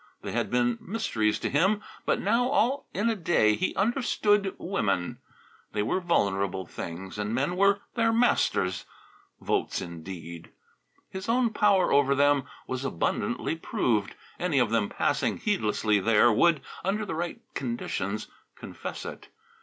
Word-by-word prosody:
They - - -4
had - - -1
been 120 -1 +1
mysteries 110 - 0
to - - 0
him, 195 +8 +2 0.2
but - - +2
now, 230 +5 +2
all 275 0 +1
in 205 +4 0
a 230 - +2
day, 160 - +3
he 185 - -1
understood 205 -3 +1
women. 105 - -1 0.5
They 105 - 0
were 115 - 0
vulnerable 100 - 0
things, 90 +4 -7
and 105 +2 -1
men 145 +7 0
were 200 +1 +3
their 230 -1 +2
masters. 225 - +2 0.6
Votes, - - -1
indeed! 85 -1 -8 0.6
His 190 +3 -6
own 240 -1 +3
power 205 -3 +3
over 140 -1 +4
them 145 0 +3 0.2
was 130 +1 -4
abundantly 135 - -1
proved. 110 -10 -1 0.2
Any 175 -5 0
of 120 -4 +3
them 115 -3 +1
passing - - 0
heedlessly 110 - +1
there 115 +3 +4
would, 165 +5 +4 0.2
under 205 +3 0
the - - -4
right 170 +2 -3
conditions, 110 -4 -3 0.3
confess - - -7
it. - - -8
140 Hz, 145 wpm, -27 LUFS, -, 0.6 s, over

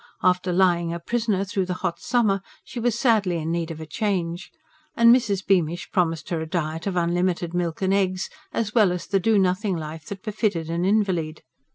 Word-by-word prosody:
After 180 0 +2
lying 175 -2 +2
a 170 - -4
prisoner 215 0 -1
through 190 -1 -2
the 180 - -2
hot 170 -2 -1
summer, 220 -6 +1 0.2
she 245 - -7
was 235 -1 0
sadly 215 -9 +2
in 160 0 -3
need 170 -1 -2
of 160 -1 -6
a 160 - -6
change. 175 0 -2 0.5
And 235 +1 +7
Mrs. 205 -7 -1
Beamish 175 -3 +1
promised 165 -4 0
her 165 -2 -1
a 160 - -5
diet 165 0 -2
of 195 - -2
unlimited 175 0 0
milk 175 0 -2
and 190 0 +2
eggs, 185 -2 0 0.2
as 215 -2 -2
well 215 -6 +4
as 180 -1 -4
the 195 -1 +1
do 220 +3 +3
nothing 190 0 +1
life 155 0 -7
that 195 -2 -7
befitted 200 -7 -1
an 170 +2 0
invalid. 185 -6 0
185 Hz, 200 wpm, -24 LUFS, 170-200 Hz, 0.5 s, And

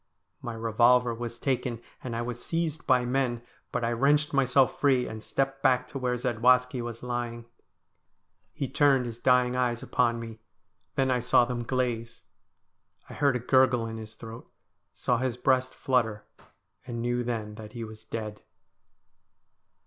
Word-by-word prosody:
My 120 -4 -5
revolver 115 +2 +3
was 120 0 -6
taken, 125 -2 -1 0.2
and 120 -3 -4
I 115 - -2
was 120 0 -5
seized 165 -2 -2
by 125 -2 +4
men, 125 -2 0 0.3
but - - -2
I 115 - +1
wrenched 145 +5 +2
myself 135 -1 +3
free, 130 -3 +3
and 110 0 -7
stepped 135 +3 -2
back 130 -2 +3
to 140 - -5
where 125 -1 0
Zadwaski 125 +1 +2
was 120 0 -6
lying. 120 -1 -4 1.1
He 140 -3 -3
turned 135 -1 +3
his 115 -1 -6
dying 125 0 +3
eyes 120 -2 0
upon 120 -1 +1
me. 115 -1 -8 0.6
Then 135 -1 +2
I 125 - +2
saw 125 0 +4
them 120 0 -3
glaze. 120 -2 -2 0.9
I - - -8
heard 140 -3 +2
a - - 0
gurgle 125 -1 +3
in 115 0 -5
his 110 -1 -9
throat, 115 0 -10 0.4
saw 120 -1 0
his 130 -2 -1
breast 130 0 +1
flutter, 115 -5 0 0.6
and 120 -2 -4
knew 120 0 0
then 110 -3 -3
that 105 +1 -10
he 120 -2 -5
was 110 -1 -10
dead. 105 -2 -6
125 Hz, 160 wpm, -28 LUFS, 115-130 Hz, 1.1 s, by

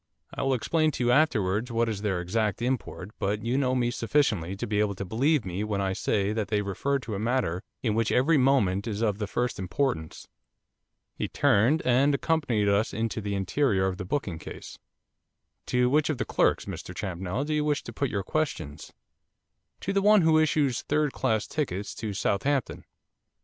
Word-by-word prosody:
I - - -4
will 135 -1 +2
explain 155 +6 +1
to 125 - -2
you 120 - +3
afterwards 115 -6 +2
what 115 0 +1
is 105 -3 -3
their 95 -4 -1
exact 105 +2 -1
import, 120 -6 -3
but 105 +2 -1
you 120 +2 0
know 130 -2 +1
me 120 -1 +1
sufficiently 115 - 0
to 95 - -4
be 105 -1 -1
able 105 -1 +1
to 100 - -5
believe 135 - +1
me 95 +2 -3
when 105 -2 -2
I 95 -1 0
say 100 +2 0
that 110 -2 -2
they 105 -1 0
refer 135 +8 -1
to 125 -5 -6
a 100 - -3
matter 110 -6 0 0.2
in 110 -4 +1
which 115 0 +1
every 145 +5 +3
moment 115 -7 +2
is 110 0 -2
of 105 -2 0
the 105 - -2
first 120 +4 -2
importance.' 95 - -2 0.9
He - - -3
turned 130 +11 +3
and 135 +3 +4
accompanied 140 -10 0
us 100 +2 +1
into 115 0 -2
the 100 -1 -3
interior 100 +1 +1
of 95 -1 -1
the - - -4
booking 95 - -2
case. - - -9 0.9
'To 125 0 +2
which 145 +3 +2
of 155 - -1
the - - -2
clerks, - - +1
Mr - - -7
Champnell, 95 +7 -3
do 155 - -2
you 150 0 +1
wish 150 -1 0
to - - -8
put 140 -2 -1
your 100 -2 -2
questions?' 95 - -3 0.9
'To 195 - -2
the 195 - +2
one 210 0 +6
who 160 -1 +5
issues 150 -5 +1
third 150 -1 0
class 110 -5 0
tickets 105 -10 -3
to 105 -3 -5
Southampton. 135 +9 -1
115 Hz, 195 wpm, -27 LUFS, 100-140 Hz, 0.9 s, one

